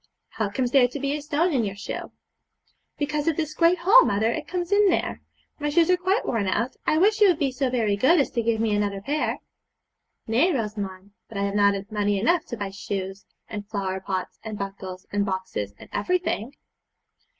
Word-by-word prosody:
'How 215 -2 -2
comes 245 +4 -1
there 260 -2 +6
to 270 +4 -6
be 280 +1 -1
a 300 - -4
stone 305 +4 0
in 250 -4 +2
your 195 -2 -3
shoe?' 200 - -6 0.9
'Because 300 +1 -1
of 325 - +2
this 310 -2 -2
great 335 +3 +4
hole, 395 +9 +7
mother; 220 +3 +1
it 290 - -4
comes 355 +1 -3
in 405 0 +5
there. - - -1 0.4
My 295 0 -1
shoes 330 +3 +4
are - - +6
quite 375 +5 0
worn 215 -5 0
out. 230 +6 0
I 310 - +3
wish 415 +5 +3
you 415 - +8
would 355 -4 +3
be 275 -3 0
so 260 0 -1
very 225 -5 +1
good 305 - +4
as 280 - +1
to 235 - 0
give 230 -1 0
me 220 -1 +1
another 205 -1 -1
pair.' 295 +8 -1 0.8
'Nay, 255 +12 +3
Rosamond, 205 -4 -4 0.2
but 220 - -7
I 200 - 0
have 200 0 -1
not 200 -1 +4 0.2
money 205 -1 +1
enough 340 - +2
to 235 - -6
buy 200 -2 -4
shoes, 195 -1 -5 0.2
and 205 -1 -7
flower 190 -3 -2
pots, 190 -1 -4
and 215 -1 -5
buckles, 195 -2 -6
and 205 0 +1
boxes, 185 - -3
and - - -13
everything.' 295 - -1
230 Hz, 205 wpm, -25 LUFS, 200-310 Hz, 0.9 s, you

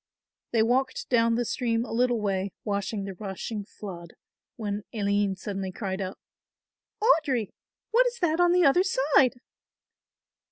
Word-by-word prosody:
They 225 -2 +3
walked 265 - 0
down 230 -1 +3
the 240 +1 0
stream 230 -1 0
a - - -9
little 240 0 +2
way 195 -2 -1
watching 200 0 -2
the 195 0 -5
rushing 200 +2 -5
flood, 175 -4 -9 0.4
when 205 -2 -3
Aline 200 -2 +1
suddenly 195 0 -4
cried 190 -1 -4
out, 190 0 -4 0.9
"Audry, 275 - +3 0.4
what - - +5
is 485 0 -3
that 345 -5 +1
on 350 0 +5
the 355 -1 +4
other 280 +6 +5
side?" 275 -7 +3
225 Hz, 145 wpm, -27 LUFS, 200-270 Hz, 0.9 s, what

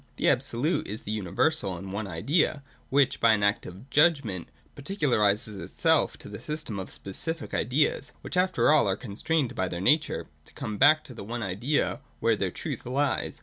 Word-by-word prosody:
The - - +2
Absolute 145 +9 0
is 105 +2 -5
the 105 - -4
uni 105 -4 -3
versal 100 - 0
and 95 +2 -8
one 100 0 -3
idea, 140 - 0 0.3
which, 135 -1 +2
by 115 -1 +5
an 105 -1 0
act 100 +2 +1
of 95 +9 -11
'judgment,' 140 - +2 0.3
particularises 110 - +1
itself - - +1
to - - -12
the - - -8
system 150 -10 -4
of 95 - -6
specific 160 - -2
ideas; 135 +6 0
which - - -5
after 185 -3 +3
all 150 -8 +4
are 95 0 0
constrained 130 - -1
by 95 - -1
their 85 -1 -5
nature 150 - +2 0.2
to - - -18
come 105 -1 -5
back 155 +3 +6
to 130 - -11
the 115 - -8
one 115 +3 -4
idea 110 +10 -1 0.2
where - - +2
their - - -1
truth - - -6
lies. 140 +3 -1
120 Hz, 190 wpm, -27 LUFS, 100-150 Hz, 0.3 s, back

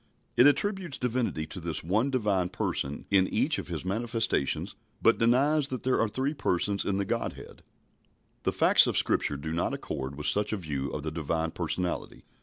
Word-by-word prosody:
It 125 - +7
attributes 185 0 +1
divinity 120 -10 -1
to 90 +4 -8
this 85 -2 -2
One 105 +10 +1
Divine 105 -8 +1
Person 70 -4 -2
in 95 -2 +5
each - - +1
of - - -6
His - - -5
manifestations, 110 - -1 0.3
but - - +4
denies 140 +6 +3
that 130 -3 -5
there 130 0 +2
are 115 - +2
three 130 +7 -1
Persons 100 - 0
in 95 - 0
the 100 - 0
Godhead. - - -4 0.8
The - - 0
facts - - +5
of - - 0
Scripture 75 - +1
do 80 +3 -5
not 85 +2 -1
accord 65 +1 -5
with 75 +1 -6
such 105 +1 +1
a - - 0
view 70 -6 -3
of 75 - -5
the 80 - -3
Divine 80 +1 -2
Personality. 90 +1 -3
100 Hz, 185 wpm, -28 LUFS, 80-125 Hz, 0.8 s, It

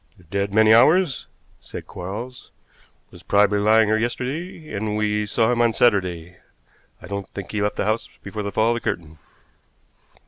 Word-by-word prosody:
"Dead 100 0 -1
many 110 +1 +5
hours," 155 +5 +4 0.3
said - - -9
Quarles; 110 +8 -7 0.6
"was - - -14
probably 105 0 +3
lying 110 +1 +4
here 110 +1 +2
yesterday, 150 +8 -4
and 105 +1 -2
we 105 0 0
saw 110 +2 +1
him 120 -1 +1
on 120 -1 +3
Saturday. 90 -7 +1 0.7
I - - -8
don't 100 -1 -5
think 95 -3 -6
he 105 - -2
left 105 0 0
the - - -2
house 110 +2 -1
before 105 +2 -5
the 100 0 -4
fall 110 +2 +2
of - - +2
the 120 - -2
curtain." 80 -7 -4
105 Hz, 170 wpm, -22 LUFS, 100-120 Hz, 0.7 s, many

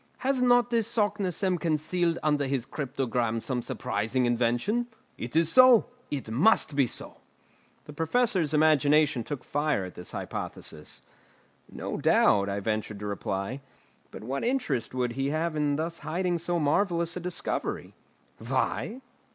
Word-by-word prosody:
Has 265 -1 0
not 245 -1 +4
this 230 -2 +1
Saknussemm 200 -5 0
concealed 165 +2 0
under 150 -2 +1
his 130 -3 -1
cryptogram 125 -5 -2
some 125 +1 -3
surprising 115 +3 -1
invention? 120 - +1 0.3
It 120 +5 -7
is 165 0 +3
so; 255 -3 +6 0.2
it 135 -6 -4
must 155 - +3
be 140 -3 +3
so!" - - -4 0.7
The 150 - -10
Professor's 175 - +1
imagination 150 -3 +3
took 140 -1 -5
fire 145 -9 0
at 90 - -9
this 90 - -6
hypothesis. 75 - -6 0.7
"No - - -5
doubt," 100 -2 +3
I 100 +1 -2
ventured 110 0 -2
to 105 - -7
reply, 100 +4 -3 0.5
"but - - -10
what 135 +4 -3
interest 195 - -1
would 125 -1 0
he 135 +3 -2
have 155 +2 -1
in 145 -1 +1
thus 165 +2 -3
hiding 175 +2 -1
so 175 +1 -1
marvellous 170 +2 +1
a - - -3
discovery?" 180 0 -3 0.5
"Why? 245 +5 -2
150 Hz, 145 wpm, -28 LUFS, 125-180 Hz, 0.7 s, so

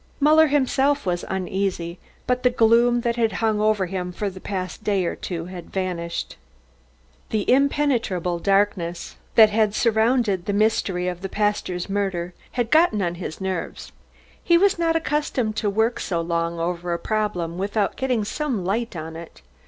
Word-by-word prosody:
Muller 310 +2 +6
himself 280 -1 +1
was 175 -1 -1
uneasy, 190 -2 -2 0.3
but 250 0 0
the 250 - +4
gloom 240 0 +4
that 235 0 -1
had 225 -2 +1
hung 220 -2 0
over 215 -3 +2
him 180 0 -4
for 200 +2 -3
the 185 - -10
past 185 0 -5
day 200 -4 +1
or - - -2
two 165 -3 -5
had 180 -1 -9
vanished. 175 -3 -3 0.9
The 215 -2 -1
impenetrable 245 - +1
darkness 195 -3 0 0.2
that 220 -2 +8
had 215 -1 +2
surrounded 220 -4 +2
the 205 - 0
mystery 200 -4 +1
of 180 -1 -4
the 195 - -4
pastor's 205 -4 -1
murder 190 -3 -2 0.2
had 240 -2 -1
gotten 315 -9 +4
on 175 -1 -1
his 160 - -6
nerves. 190 -3 -4 0.5
He 340 -1 +5
was 390 0 +3
not 330 -1 +2
accustomed 295 -8 -1
to 210 -1 0
work 220 +4 +1
so 170 -3 -2
long 170 0 -1
over 175 +1 -2
a - - 0
problem 180 -4 -2
without 200 +1 -1
getting 250 -5 0
some 245 - -2
light 225 +3 -1
on 160 0 -6
it. 165 0 -11
205 Hz, 165 wpm, -23 LUFS, 180-235 Hz, 0.9 s, that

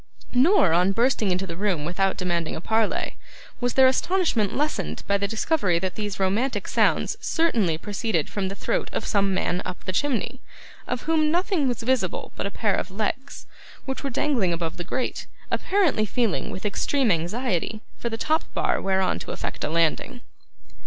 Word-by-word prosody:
Nor, 255 - +5
on 180 +3 +3
bursting 230 -2 +2
into 185 +1 0
the 170 -3 -6
room 185 -5 0
without 190 +3 0
demanding 175 -3 -1
a - - -4
parley, 220 +4 0 0.4
was 245 -1 -1
their 265 - +7
astonishment 260 - +2
lessened 280 - -1
by 200 - +2
the 200 - 0
discovery 220 - +1
that 185 +1 -2
these 205 -2 -4
romantic 205 +8 0
sounds - - +2
certainly 225 - +1
proceeded 205 -3 -1
from 200 -2 -2
the 195 - -5
throat - - -1
of - - -2
some 200 -2 +2
man 180 -1 0
up 180 - -6
the - - -2
chimney, 260 +4 -1 0.5
of 245 - -2
whom 310 -1 +2
nothing 345 -3 +1
was 240 -2 -2
visible 235 -7 0
but - - -2
a - - -3
pair 210 0 0
of - - -1
legs, 220 +7 -3 0.4
which 265 -1 -4
were 275 - -1
dangling 235 -8 +1
above 170 0 -2
the 175 - -3
grate; 255 +8 -3 0.2
apparently 350 - +2
feeling, 225 -2 0
with 190 - -6
extreme 245 +4 +1
anxiety, 190 +4 -1 0.2
for 235 - -2
the 225 - -4
top 315 +6 +1
bar - - +1
whereon 190 -1 +1
to - - -8
effect - - -4
a - - 0
landing. 170 - 0
210 Hz, 180 wpm, -25 LUFS, 185-260 Hz, 0.5 s, their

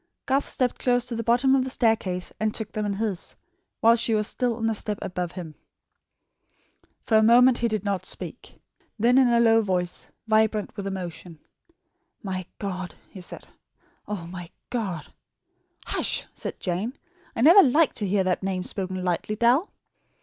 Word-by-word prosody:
Garth 270 +1 +1
stepped 250 -2 -1
close 245 -1 +2
to 240 - -4
the 230 - -2
bottom 245 +4 +3
of 265 - +2
the 260 - -4
staircase 220 -8 0
and 215 0 +1
took 220 -2 -3
them 215 -1 -2
in 200 - -1
his, 200 -3 -4 0.5
while 230 +1 +6
she 230 -1 +2
was 215 0 +1
still 240 +1 0
on 225 0 -3
the 225 - +2
step 210 -1 -3
above 180 -1 -4
him. 170 -4 -7 1.5
For 220 - +3
a - - +5
moment 240 +3 +6
he 235 - +2
did 215 -3 -2
not 200 -2 -2
speak. - - -7 0.4
Then 240 +4 +4
in 260 - +5
a 235 -1 +3
low 225 -1 +5
voice, 180 -4 -2 0.2
vibrant 220 -1 +1
with 200 -2 -5
emotion: 175 -3 -6 0.9
"My 185 -2 -4
God!" 185 -3 -5 0.2
he 190 - -10
said, 180 - -7 0.6
"Oh, 205 -5 -4
my 175 0 -8 0.2
God!" 195 - -4 0.7
"Hush," - - -1
said - - -6
Jane; 195 +9 -3 0.4
"I - - -2
never 340 +9 +9
like 300 +2 +3
to 205 - -2
hear 195 0 +2
that 185 -1 0
name 190 -1 -2
spoken 185 -1 -4
lightly, 180 +4 -1
Dal." 245 - +3
215 Hz, 170 wpm, -25 LUFS, 185-235 Hz, 1.5 s, never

